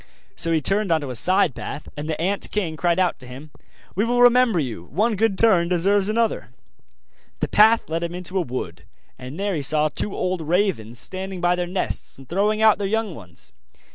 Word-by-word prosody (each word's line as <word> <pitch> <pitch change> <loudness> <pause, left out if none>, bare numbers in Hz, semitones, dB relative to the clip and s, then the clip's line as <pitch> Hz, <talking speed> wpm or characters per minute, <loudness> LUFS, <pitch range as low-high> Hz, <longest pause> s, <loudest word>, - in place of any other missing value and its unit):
So 165 - +1
he 160 -1 +2
turned 195 +3 +1
on 160 -1 +2
to 140 -3 -5
a - - -5
side 185 - +2
path 150 - -7
and 150 +1 -6
the 155 - -3
ant 195 +4 -1
king 180 -7 -2
cried 170 +1 0
out 185 -2 +1
to 130 - -12
him: 135 +5 -11 0.4
'We 205 +4 0
will 245 +1 +2
remember 245 -4 +5
you 120 - -3
one 215 - 0
good 210 -1 +1
turn 190 -7 +4
deserves 195 +3 +2
another!' 220 - -1 0.9
The - - -1
path 220 +2 +4
led 165 +1 -2
him 170 +1 -4
into 180 +1 -3
a - - +1
wood, 95 - -6 0.4
and 130 +7 -8
there 200 0 -1
he 155 - -2
saw 155 +2 +1
two 195 - -3
old 185 -1 -2
ravens 160 - -1
standing 190 +5 -2
by 175 0 +2
their 180 0 -3
nest, 180 +1 -3
and 135 -1 -14
throwing 210 +4 0
out 215 -1 +5
their 200 - -1
young 220 -2 -1
ones. 90 - -12
180 Hz, 210 wpm, -22 LUFS, 155-205 Hz, 0.9 s, remember